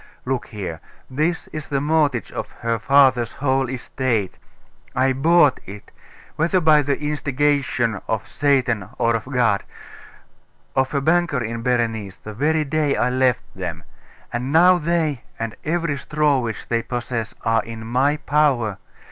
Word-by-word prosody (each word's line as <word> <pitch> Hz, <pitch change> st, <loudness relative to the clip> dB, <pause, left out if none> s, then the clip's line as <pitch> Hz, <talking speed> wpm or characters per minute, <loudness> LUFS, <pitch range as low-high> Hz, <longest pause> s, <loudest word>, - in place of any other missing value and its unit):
Look 130 Hz, -1 st, -2 dB
here! 90 Hz, -7 st, -6 dB, 0.3 s
This 155 Hz, +6 st, 0 dB
is 155 Hz, -1 st, -6 dB
the 140 Hz, -, 0 dB
mortgage 145 Hz, -4 st, +1 dB
of -, -, -5 dB
her 115 Hz, -1 st, 0 dB
father's 130 Hz, -2 st, +4 dB
whole 135 Hz, -2 st, 0 dB
estate. 125 Hz, -5 st, -2 dB, 0.6 s
I 130 Hz, +1 st, +3 dB
bought 150 Hz, +1 st, +4 dB
it 100 Hz, +2 st, -10 dB, 0.5 s
whether 170 Hz, +4 st, +2 dB
by 155 Hz, -3 st, +5 dB
the 140 Hz, 0 st, -1 dB
instigation 145 Hz, -6 st, 0 dB
of 110 Hz, -1 st, -2 dB
Satan 125 Hz, -8 st, +1 dB
or 115 Hz, -1 st, +2 dB
of 115 Hz, -, -3 dB
God 120 Hz, -6 st, +1 dB, 1.1 s
of 130 Hz, +2 st, +1 dB
a 140 Hz, -, +1 dB
banker 160 Hz, -4 st, +2 dB
in 115 Hz, +1 st, -4 dB
Berenice, 115 Hz, -5 st, -1 dB
the 110 Hz, -, -9 dB
very 155 Hz, +7 st, +1 dB
day 150 Hz, 0 st, 0 dB
I 125 Hz, -, +1 dB
left 125 Hz, -1 st, +2 dB
them; 85 Hz, -4 st, -5 dB, 0.5 s
and 125 Hz, +3 st, -2 dB
now 175 Hz, +3 st, +6 dB
they, 160 Hz, -5 st, 0 dB, 0.2 s
and 115 Hz, -1 st, -4 dB
every 165 Hz, -2 st, -1 dB
straw 150 Hz, -1 st, +1 dB
which 115 Hz, -4 st, -4 dB
they 115 Hz, -1 st, 0 dB
possess, 120 Hz, -2 st, -4 dB
are 115 Hz, 0 st, +3 dB
in 115 Hz, -1 st, -8 dB
my 130 Hz, +6 st, +1 dB
power. 135 Hz, -10 st, +1 dB
130 Hz, 150 wpm, -21 LUFS, 115-150 Hz, 1.1 s, now